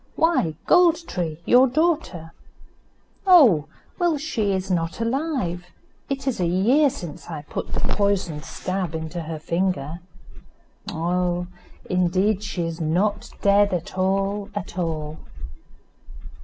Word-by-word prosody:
"Why, 320 - +2
Gold 340 -1 +4
tree, 165 -4 -3
your 255 +2 +6
daughter." 280 - -1 0.9
"Oh! 245 - +7 0.3
well, 345 -3 +2
she 245 -9 -1
is 190 0 -2
not 165 +1 -1
alive. 230 - -2 0.4
It 275 0 -3
is 265 -6 -1
a 175 - +1
year 235 - +4
since 175 - -8
I 155 -3 -6
put - - -6
the - - -2
poisoned 190 -7 0
stab 185 -3 -4
into 160 +2 -4
her 160 0 -5
finger." 170 -1 -2 0.9
"Oh! 175 +1 -1 0.4
indeed 185 +3 +1
she 180 -4 -3
is 165 0 -4
not 195 +7 0
dead 200 -1 +4
at 170 +1 -5
all, 195 +2 0
at 205 -3 -5
all." 155 -3 -3
185 Hz, 125 wpm, -23 LUFS, 170-230 Hz, 0.9 s, Oh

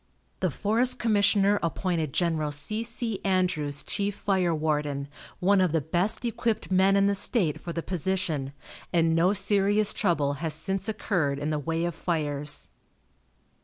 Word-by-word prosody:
The - - +1
forest 230 +5 +1
commissioner 205 -2 +3
appointed 165 -2 -1
Gen. 160 -2 0
C. 180 +10 -2
C. 230 -2 -4
Andrews 180 -7 0
chief 200 0 0
fire 190 -4 0
warden, 150 -3 -1 0.3
one 195 +1 +3
of 180 -4 +1
the 165 - +3
best 180 - -1
equipped 225 -3 -2
men 190 +1 +4
in 200 - +4
the 200 0 +3
state 195 - +1
for 170 - -6
the 165 0 -4
position, 170 -6 -1 0.4
and 165 -1 +2
no 175 +4 +3
serious 205 +1 +3
trouble 150 -8 +1
has 160 -2 0
since 190 +5 -2
occurred 175 -9 -1
in 150 +2 -3
the 150 - -1
way 165 +3 -2
of 175 - -2
fires. 150 -4 -2
180 Hz, 155 wpm, -27 LUFS, 155-200 Hz, 0.4 s, men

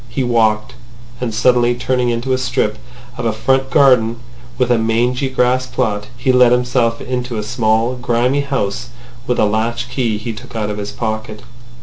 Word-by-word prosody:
He 130 +2 -2
walked. 110 -1 +1 0.5
And 125 -2 -2
suddenly 120 +2 +3
turning 125 0 0
into 120 +3 -1
a - - +2
strip 105 -4 -1 0.4
of 120 - -3
a - - +2
front 130 +4 0
garden 125 -4 +4 0.4
with 125 -1 +1
a 120 - +3
mangy 120 +4 0
grass 130 0 +1
plot, 110 -5 -2
he 130 +2 +1
let 125 -1 +5
himself 125 -2 +1
into 125 -2 -3
a 105 - -2
small 110 +1 +1
grimy 125 +3 +1
house 125 -4 -2 0.4
with 125 - 0
a - - +3
latch 115 +3 -1
key 120 -4 0
he 115 +2 -5
took 120 +2 -12
out 105 -2 -2
of 105 - -5
his 100 0 -4
pocket. 110 -1 -4
120 Hz, 180 wpm, -17 LUFS, 110-125 Hz, 0.5 s, let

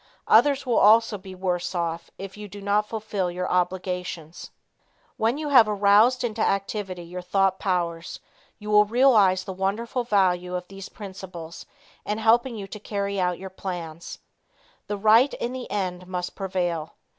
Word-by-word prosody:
Others 280 -1 +4
will 245 -2 +2
also 220 0 +5
be 190 0 -10
worse 180 0 -2
off 170 -1 -3
if 195 0 -8
you 210 0 -8
do 205 +1 -10
not 205 +1 0
fulfil 210 -4 -2
your 180 +1 -3
obligations. 180 -2 -3 0.7
When 230 +5 0
you 300 -1 -3
have 240 -6 +6
aroused 210 +5 +4
into 225 -2 -2
activity 195 -3 -1
your 180 +2 -7
thought 190 +1 +1
powers 170 -3 -2 0.4
you 210 -1 -6
will 210 0 +6
realize 210 -6 +4
the 190 0 -6
wonderful 215 +7 -2
value 180 -5 +1
of 180 0 -5
these 195 -1 -9
principles 185 -5 -9 0.4
in 210 - -2
helping 230 +3 +3
you 205 -2 -6
to 210 +2 -9
carry 200 -1 -3
out 180 -1 0
your 190 0 -9
plans. 170 -4 -6 0.7
The 205 - -3
right 220 +6 +4
in 240 +1 -4
the 260 -1 -6
end 185 -3 -3
must 180 -1 -4
prevail. 175 -5 -3
195 Hz, 160 wpm, -25 LUFS, 180-215 Hz, 0.7 s, have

